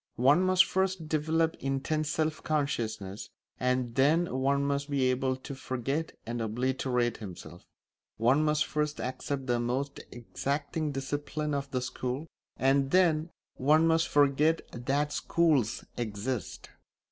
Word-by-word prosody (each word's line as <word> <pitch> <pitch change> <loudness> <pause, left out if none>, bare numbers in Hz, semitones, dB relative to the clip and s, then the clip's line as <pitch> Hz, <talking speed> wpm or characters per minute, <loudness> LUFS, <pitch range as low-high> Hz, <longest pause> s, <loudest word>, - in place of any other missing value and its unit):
One 140 +8 +5
must 185 0 +5
first 190 -3 -1
develop 160 +1 +1
intense 145 +3 -1
self 155 0 -1
consciousness, 115 -10 -2 0.3
and 125 -1 0
then 150 +4 +3
one 140 +1 +2
must 140 0 -1
be 140 -2 +1
able 130 +1 0
to 130 +2 -8
forget 135 +4 -3
and 120 0 -3
obliterate 125 +1 0
himself. 90 -4 -10 0.5
One 125 +7 +3
must 150 0 +2
first 150 0 -2
accept 130 +2 -3
the 120 -2 +1
most 130 +4 -2
exacting 145 +6 -3
discipline 145 +2 -3
of 140 0 -2
the 130 -2 -1
school, 125 +3 -3 0.3
and 135 +1 +3
then 165 -2 +3 0.3
one 155 +5 +4
must 165 +1 +3
forget 145 +3 +3
that 140 +5 -1
schools 150 -10 +1
exist. 115 +1 -4
140 Hz, 130 wpm, -29 LUFS, 125-155 Hz, 0.5 s, One